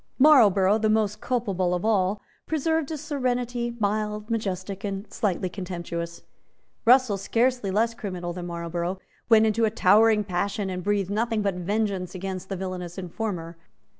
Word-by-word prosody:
Marlborough, 215 -8 +6
the 220 0 +1
most 215 -1 +1
culpable 195 -8 0
of 180 - -3
all, 200 -2 +2 0.3
preserved 320 -1 0
a 315 - -3
serenity, 245 -5 -2
mild, 210 +1 -1
majestic 195 -3 -3
and 200 0 -3
slightly 190 -3 -1
contemptuous. 170 -2 -5 0.6
Russell, 240 -4 +5
scarcely 235 +1 +1
less 225 +4 +1
criminal 185 -6 -5
than 175 0 -6
Marlborough, 170 +1 -3 0.3
went 220 -1 +6
into 220 +1 +1
a 220 - +4
towering 215 +1 +4
passion, 195 +1 -2
and 180 -1 -4
breathed 200 -1 0
nothing 225 0 0
but 200 -1 +1
vengeance 190 0 -2
against 190 0 -5
the 195 - -2
villanous 180 -1 -5
informer. 180 -3 -4
205 Hz, 145 wpm, -25 LUFS, 185-225 Hz, 0.6 s, Marlborough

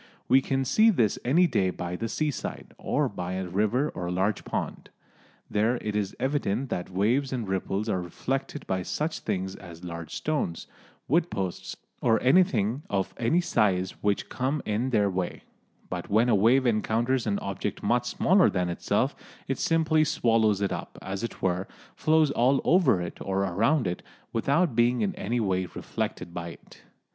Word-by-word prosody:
We 135 - +5
can 135 0 -1
see 215 - +5
this 120 - +2
any 165 +9 +4
day 100 - +1
by 90 -1 -4
the 115 +5 -3
seaside, 150 +2 -3
or - - 0
by 90 0 -5
a 95 0 -3
river 110 +10 +1
or 90 0 -4
large 95 +4 0
pond. - - -4 0.6
There 110 +4 +1
it 105 -1 -4
is 100 -2 -1
evident 130 -2 -1
that 90 - -2
the - - -16
waves 120 +8 +1
and 120 -5 -3
ripples 95 +2 -2
are 95 -4 0
reflected 135 - -4
by 95 -1 -1
such 155 - -2
things 95 +1 -3
as 85 -2 -12
large 85 -2 -6
stones, 145 - -2 0.4
wood 170 +4 +2
posts 95 -3 -4 0.2
or 115 -2 +3
anything 130 - +3
of 95 -2 -1
any 140 +10 +2
size 95 - +1
which 100 -1 0
come 135 +3 -2
in 110 +5 0
their 105 -5 +3
way; 90 -2 -3 0.4
but 90 -1 -5
when 110 +4 +3
a - - +4
wave 120 +7 +4
encounters 115 +2 +1
an 100 -1 +1
object 100 -1 -4
much - - +1
smaller - - +4
than 90 -1 -1
itself 85 - 0 0.3
it - - -2
simply 160 -1 +3
swallows 115 -7 +2
it 100 - 0
up, - - -6
as 95 +3 -4
it 115 - -6
were, 95 +1 0 0.3
flows 155 -2 +3
all 130 +2 +3
over 160 - +4
it 85 - -7
or 95 0 -1
around 115 - +2
it, 90 0 -2 0.3
without 140 +5 +1
being 120 +1 +3
in 195 -2 0
any 180 -10 -2
way 95 -4 0
reflected 85 - -4
by 85 -1 -5
it. - - -14
110 Hz, 175 wpm, -27 LUFS, 95-135 Hz, 0.6 s, We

